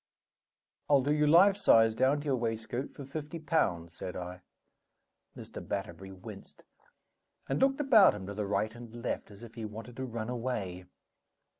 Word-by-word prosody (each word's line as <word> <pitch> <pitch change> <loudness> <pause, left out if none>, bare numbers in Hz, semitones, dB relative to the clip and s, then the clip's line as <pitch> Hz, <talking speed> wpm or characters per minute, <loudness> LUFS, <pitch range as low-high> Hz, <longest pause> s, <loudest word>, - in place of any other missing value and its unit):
"I'll 140 -3 +5
do 145 +2 +2
you, 150 0 +2
life 185 +6 +7
size, 115 - +5
down 135 +5 +2
to - - -11
your 140 -3 +2
waistcoat, 115 +2 -3
for 140 - -10
fifty 150 +3 -6
pounds," 95 - 0
said 90 - -6
I. 90 0 -6 1.0
Mr. - - -8
Batterbury 95 -1 -5
winced, 95 -1 -11 0.8
and 135 - -1
looked 270 +1 +3
about 225 - +6
him 100 -2 -7
to 100 - -6
the 105 0 -3
right 110 +2 0
and 120 0 -10
left, - - -3
as 105 +2 -13
if 115 -1 -11
he 115 - -7
wanted 110 +3 -8
to 130 - -3
run 115 -2 -5
away. 110 -7 -3
120 Hz, 170 wpm, -31 LUFS, 100-145 Hz, 1.0 s, life